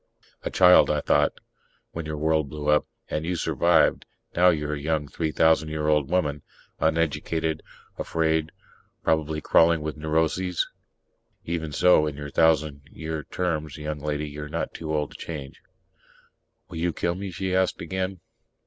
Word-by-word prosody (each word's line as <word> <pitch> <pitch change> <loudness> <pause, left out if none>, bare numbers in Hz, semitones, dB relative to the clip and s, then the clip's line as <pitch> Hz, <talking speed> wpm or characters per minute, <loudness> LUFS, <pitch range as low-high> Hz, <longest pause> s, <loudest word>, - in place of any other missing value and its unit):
A - - -3
child, 90 -1 +6
I - - +2
thought, - - +2 0.6
_when 85 -1 -4
your 75 0 -4
world 80 -1 +1
blew 75 0 -4
up. 75 0 +3 0.2
And 75 - -1
you 90 +2 -1
survived. 85 0 +2 0.3
Now 90 +1 +6
you're 75 -3 0
a 75 - -3
young 75 -1 -1
three 80 +2 -2
thousand 80 0 +3
year 75 -1 -2
old 75 -2 +2
woman... 75 -5 0 0.4
uneducated, 80 0 0 0.4
afraid, 80 -1 0 0.5
probably 80 -1 0
crawling 85 +1 +4
with 75 0 -4
neuroses. 80 +3 0 0.8
Even 80 -2 -3
so, 90 -1 +4
in 75 - -4
your 75 -1 -7
thousand 75 -3 +2
year 80 -2 -5
terms, 80 -5 -3
young 75 0 -4
lady, 75 0 -2
you're 75 0 -7
not - - -3
too 80 -1 -5
old 75 -2 -1
to - - -11
change._ 70 -5 -7 1.1
"Will 85 - -8
you 85 +1 0
kill 85 - -1
me?" 95 +2 -5
she 95 +1 -2
asked 95 -1 +1
again. 95 +1 -3
80 Hz, 155 wpm, -25 LUFS, 75-85 Hz, 1.1 s, child